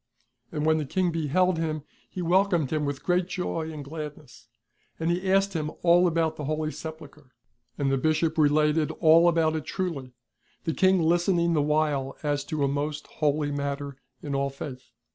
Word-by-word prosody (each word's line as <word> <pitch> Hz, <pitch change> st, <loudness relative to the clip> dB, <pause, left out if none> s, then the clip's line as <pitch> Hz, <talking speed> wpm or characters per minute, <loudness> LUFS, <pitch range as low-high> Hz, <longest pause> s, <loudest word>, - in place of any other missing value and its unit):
And 150 Hz, -1 st, -2 dB
when 160 Hz, 0 st, +3 dB
the 150 Hz, -, -2 dB
King 180 Hz, +3 st, 0 dB
beheld 165 Hz, +3 st, +1 dB
him, 155 Hz, -2 st, -2 dB, 0.3 s
he 180 Hz, -, -5 dB
welcomed 175 Hz, -4 st, +2 dB
him 150 Hz, -1 st, 0 dB
with 140 Hz, -1 st, -4 dB
great 180 Hz, 0 st, +1 dB
joy 165 Hz, -3 st, -3 dB
and 150 Hz, -3 st, -7 dB
gladness. 150 Hz, -4 st, -9 dB, 0.5 s
And 165 Hz, +1 st, 0 dB
he 185 Hz, +2 st, -1 dB
asked 195 Hz, 0 st, +3 dB
him 155 Hz, -3 st, -2 dB
all 175 Hz, +1 st, +5 dB
about 160 Hz, -1 st, 0 dB
the 150 Hz, -, -5 dB
Holy 155 Hz, +1 st, -1 dB
Sej)ulchre; 155 Hz, -4 st, -10 dB, 0.5 s
and 140 Hz, -2 st, 0 dB
the 135 Hz, -, +1 dB
Bishop 155 Hz, +2 st, +1 dB
related 150 Hz, 0 st, +3 dB
all 165 Hz, +1 st, +5 dB
about 160 Hz, -2 st, +2 dB
it 155 Hz, -, -3 dB
trvily, 155 Hz, -10 st, -4 dB, 0.5 s
the 165 Hz, -, -1 dB
King 185 Hz, -1 st, +3 dB
listening 170 Hz, +1 st, +2 dB
the 155 Hz, -, +2 dB
while 150 Hz, -2 st, 0 dB
as 145 Hz, -1 st, 0 dB
to 150 Hz, -1 st, -2 dB
a -, -, +3 dB
most 145 Hz, +2 st, -2 dB, 0.2 s
holy 150 Hz, 0 st, +1 dB
matter 140 Hz, -1 st, -3 dB, 0.3 s
in 145 Hz, -, -4 dB
all 140 Hz, 0 st, 0 dB
faitli. 135 Hz, -1 st, -7 dB
155 Hz, 180 wpm, -26 LUFS, 145-170 Hz, 0.5 s, all